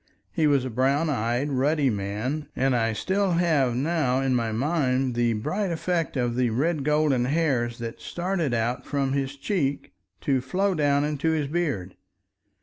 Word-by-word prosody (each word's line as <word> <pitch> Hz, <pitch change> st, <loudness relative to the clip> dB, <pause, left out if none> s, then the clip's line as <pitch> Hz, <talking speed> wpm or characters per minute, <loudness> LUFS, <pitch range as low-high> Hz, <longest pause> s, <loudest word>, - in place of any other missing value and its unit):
He 160 Hz, -4 st, +2 dB
was 140 Hz, -3 st, +2 dB
a 130 Hz, -, -4 dB
brown 140 Hz, +6 st, +1 dB
eyed 125 Hz, +3 st, -1 dB
ruddy 140 Hz, +1 st, +2 dB
man, 105 Hz, +9 st, -3 dB
and 135 Hz, -1 st, +2 dB
I 115 Hz, -1 st, +1 dB
still 190 Hz, -, 0 dB
have 155 Hz, -8 st, +2 dB
now 135 Hz, -2 st, +1 dB
in 135 Hz, -1 st, +1 dB
my 115 Hz, -2 st, 0 dB
mind 130 Hz, 0 st, 0 dB
the 120 Hz, -1 st, +1 dB
bright 185 Hz, -, -2 dB
effect 165 Hz, -2 st, -1 dB
of 120 Hz, -2 st, 0 dB
the 125 Hz, -1 st, +2 dB
red 145 Hz, +6 st, 0 dB
golden 150 Hz, -4 st, +2 dB
hairs 130 Hz, -5 st, 0 dB
that 115 Hz, -1 st, -6 dB
started 175 Hz, -5 st, -2 dB
out 120 Hz, +2 st, -1 dB
from 135 Hz, -2 st, -1 dB
his 140 Hz, 0 st, -2 dB
cheek 145 Hz, -4 st, -2 dB, 0.3 s
to 135 Hz, -3 st, +1 dB
flow 190 Hz, +10 st, 0 dB
down 145 Hz, -3 st, +2 dB
into 150 Hz, +1 st, -1 dB
his 150 Hz, -3 st, 0 dB
beard. 140 Hz, -, -2 dB
140 Hz, 165 wpm, -25 LUFS, 125-155 Hz, 0.3 s, He